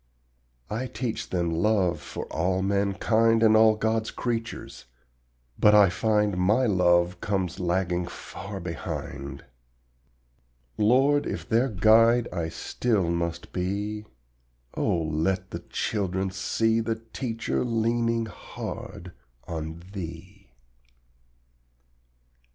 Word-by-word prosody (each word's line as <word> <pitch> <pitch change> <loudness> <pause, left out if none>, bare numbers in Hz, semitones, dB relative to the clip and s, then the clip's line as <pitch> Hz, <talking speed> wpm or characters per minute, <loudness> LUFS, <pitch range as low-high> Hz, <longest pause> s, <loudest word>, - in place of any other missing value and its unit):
I 120 +5 -3
teach 120 -2 -4
them 85 -2 0
LOVE 90 +1 +1
for - - -6
all 90 +3 0
mankind 105 +3 +2
And 110 -1 +6
all 110 0 +6
God's 110 0 0
creatures, 115 -2 -4 0.7
but 105 0 +6
I 100 -2 +7
find 105 0 +1
My 105 +8 +3
love 90 -3 +3
comes 95 -4 -1
lagging 90 0 0
far 100 +3 -8
behind. 70 -5 -6 1.3
Lord, 135 +7 +3
if - - -4
their 120 +4 +2
guide 115 +4 +5
I 85 -2 -2
still 100 0 -1
must 85 0 -3
be, 100 +4 -2 0.7
Oh 85 - 0
let 80 +4 -1
the - - -3
little - - -17
children 95 -2 -1
see 115 +4 +1
The 115 0 -1
teacher 115 +1 -3
leaning 115 0 +1
hard 90 -4 -8 0.4
on 80 0 -5
Thee. 95 +2 -8
100 Hz, 105 wpm, -26 LUFS, 90-115 Hz, 1.3 s, I